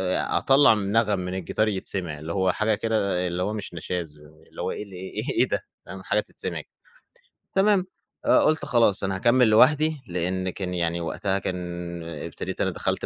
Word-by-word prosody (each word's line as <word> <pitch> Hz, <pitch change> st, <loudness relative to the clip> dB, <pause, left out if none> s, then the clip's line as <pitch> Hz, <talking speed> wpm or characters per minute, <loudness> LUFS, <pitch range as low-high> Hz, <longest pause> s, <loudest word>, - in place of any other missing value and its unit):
أطلّع 135 Hz, -4 st, +4 dB
من 100 Hz, -1 st, -2 dB
نغم 105 Hz, -4 st, +2 dB
من 90 Hz, 0 st, -4 dB
الجيتار 95 Hz, +4 st, 0 dB
يتسمع، 95 Hz, -6 st, -3 dB
اللي 80 Hz, +2 st, -5 dB
هو 95 Hz, -1 st, +2 dB
حاجة 110 Hz, +2 st, +1 dB
كده 100 Hz, -5 st, 0 dB
اللي 90 Hz, +1 st, -2 dB
هو 105 Hz, -, -1 dB
مش 105 Hz, -4 st, -6 dB
نشاز، 85 Hz, -3 st, -5 dB, 0.3 s
اللي -, -, -8 dB
هو -, -, -1 dB
اللي 100 Hz, -3 st, -7 dB
إيه 95 Hz, +1 st, -8 dB
إيه -, -, -2 dB
إيه -, -, +5 dB
ده، -, -, -2 dB, 0.2 s
فاهم 95 Hz, +1 st, -9 dB
حاجة 105 Hz, -, +1 dB
تتسمع. -, -, -5 dB, 0.9 s
تمام، 195 Hz, -1 st, +3 dB, 0.4 s
آآ، -, -, +6 dB
قُلت 155 Hz, 0 st, +2 dB
خلاص 115 Hz, -5 st, +3 dB
أنا 95 Hz, 0 st, 0 dB
هاكمّل 120 Hz, +3 st, +4 dB
لوحدي، 150 Hz, +7 st, +4 dB
لأن 90 Hz, +1 st, -1 dB
كان 90 Hz, 0 st, -4 dB
يعني 85 Hz, -1 st, -1 dB
وقتها 95 Hz, +3 st, -1 dB
كان 85 Hz, -2 st, -5 dB
ابتديت 80 Hz, -3 st, -6 dB
أنا -, -, +2 dB
دخلت -, -, -2 dB
95 Hz, 180 wpm, -25 LUFS, 90-110 Hz, 0.9 s, آآ